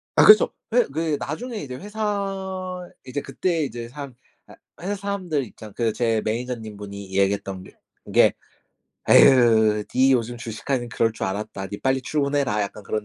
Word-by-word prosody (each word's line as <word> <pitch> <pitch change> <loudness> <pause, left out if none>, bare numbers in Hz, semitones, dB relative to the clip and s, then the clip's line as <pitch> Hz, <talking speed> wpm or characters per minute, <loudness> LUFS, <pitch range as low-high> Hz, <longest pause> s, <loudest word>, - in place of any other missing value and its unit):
아 - - +6
그쵸. 430 - +8 0.2
회 - - +5
그 160 -2 -1
나중에 225 - -5
이제 130 -3 -6
회사 195 -2 -4 0.2
이제 130 +2 -4
그때 165 +3 -1
이제 120 -4 -5
사람 135 0 -9 0.3
아 - - -14 0.3
회사 200 +3 -2
사람들 190 -8 -2
입장 105 -1 -12
그 115 -1 0
제 115 -2 +1
manager님 115 -1 -3
분이 100 -2 -8
얘기했던 100 -1 0
게 - - -14 0.4
게 - - +6 0.8
"에유, 110 -4 +6
니 130 +1 +5
요즘 120 -1 0
주식하길래 120 +2 -3
그럴 115 0 +1
줄 - - -3
알았다. 100 0 -4
니 100 - -6
빨리 130 0 +1
출근해라." 140 -6 0
약간 100 +1 -6
그런 105 +1 -3
125 Hz, 335 characters per minute, -23 LUFS, 110-165 Hz, 0.8 s, 그쵸